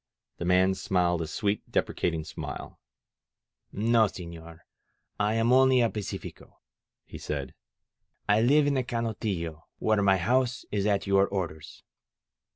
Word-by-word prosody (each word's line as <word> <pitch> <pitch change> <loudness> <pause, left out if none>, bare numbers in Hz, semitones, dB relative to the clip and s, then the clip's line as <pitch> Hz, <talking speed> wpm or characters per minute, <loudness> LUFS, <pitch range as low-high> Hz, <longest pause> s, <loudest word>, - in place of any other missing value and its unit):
The 85 - -4
man 90 +2 +4
smiled 90 -3 0
a 80 - -3
sweet, 100 +6 -1
deprecating 80 -2 -1
smile. 75 - -7 0.9
"No, 110 +1 +3
sefilor, 85 -3 -10 0.6
I 105 +1 +1
am 115 +2 +3
only 130 0 +5
a 115 - +2
pacifico," 105 -2 -7 0.5
he - - -10
said. - - -4 0.7
*^I 105 +2 +4
live 145 +4 +4
in 145 - +2
the 130 -2 +1
Canotillo, 105 -9 -3
where 110 -1 +1
my 95 -1 +4
house 125 +6 0
is 100 -1 0
at 100 -1 +1
your 100 0 +3
orders. 85 -6 -5
100 Hz, 135 wpm, -28 LUFS, 90-115 Hz, 0.9 s, only